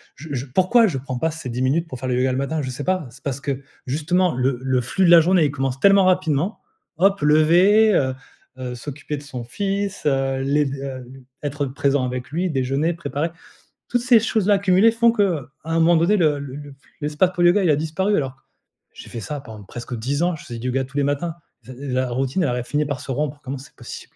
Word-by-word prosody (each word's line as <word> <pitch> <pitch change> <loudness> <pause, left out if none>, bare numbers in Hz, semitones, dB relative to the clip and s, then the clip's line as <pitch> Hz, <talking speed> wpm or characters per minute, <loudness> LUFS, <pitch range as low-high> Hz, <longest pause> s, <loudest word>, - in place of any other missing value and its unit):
je 155 +4 -11
je 130 -1 -3
pourquoi 185 - +3
je 170 - -2
prends 130 -1 -5
pas 160 - +1
ces 155 -5 -7
10 120 +1 -3
minutes 145 +6 +1
pour 130 -6 -8
faire 130 - -4
le 125 - 0
yoga 130 +1 +1
le 125 - -1
matin? 140 +3 -1
Je 130 - -4
sais 135 +3 -6
pas. 185 -4 0
C'est 125 +2 -16
parce 140 -1 -3
que 140 -1 -3 0.3
justement 165 +6 +1
le 130 +1 0
le 130 -1 +1
flux 160 +11 -1
de - - +5
la 170 - +10
journée, 175 +1 +3
il 145 - 0
commence 135 -2 -2
tellement 195 -1 +6
rapidement, 185 0 +1 0.4
hop, 195 +3 +3
lever, 175 +9 +5
heu 130 -6 +1 0.4
heu, 125 -1 -5
s'occuper 145 +4 -6
de - - -8
son 130 -4 -7
fils, 200 - -3
heu, 135 -2 +1
les 145 +2 +2
d 140 0 -4
heu, 135 -1 -5 0.2
l 135 - -13 0.2
être 145 0 -2
présent 135 0 0
avec 125 +2 -5
lui, 180 +3 -1
déjeuner, 135 +3 0
préparer. 160 0 -3 0.6
Toutes 245 - 0
ces 245 -1 +5
choses-là 210 -2 +2
cumulées 195 +3 +4
font 230 +1 +4
que, 185 - 0 0.2
à 165 - -5
un 165 - +2
moment 170 +1 +5
donné 170 +6 +3
le 155 -5 +2
le 140 -2 -7
le 145 -1 -10 0.2
l'espace 150 +5 +1
pour 175 - 0
le 175 - +7
yoga, 200 +2 +1
il 175 - +2
a 150 - +4
disparu. 190 +7 0
Alors, 135 -2 -2 0.6
j'ai - - -12
fait 115 - -6
ça 145 +7 -5
pendant 110 -6 -11
presque 120 +4 -7
10 135 +7 -2
ans, 175 0 +1
je 155 - -12
faisais 120 -1 -7
du 125 - -4
yoga 135 +1 0
tous 135 +2 -8
les 145 - +2
matins, 145 +4 -1 0.3
s - - -15
heu, 130 - -8 0.2
la 130 0 0
routine, 135 +8 -1
elle 145 - +1
aurait 125 0 -2
fini 150 +4 0
par 145 -1 -3
se 140 -2 -6
rompre, 145 +2 -2
comment 135 +2 -5
c'est 130 - -14
possible? - - -10
145 Hz, 245 wpm, -22 LUFS, 130-175 Hz, 0.6 s, la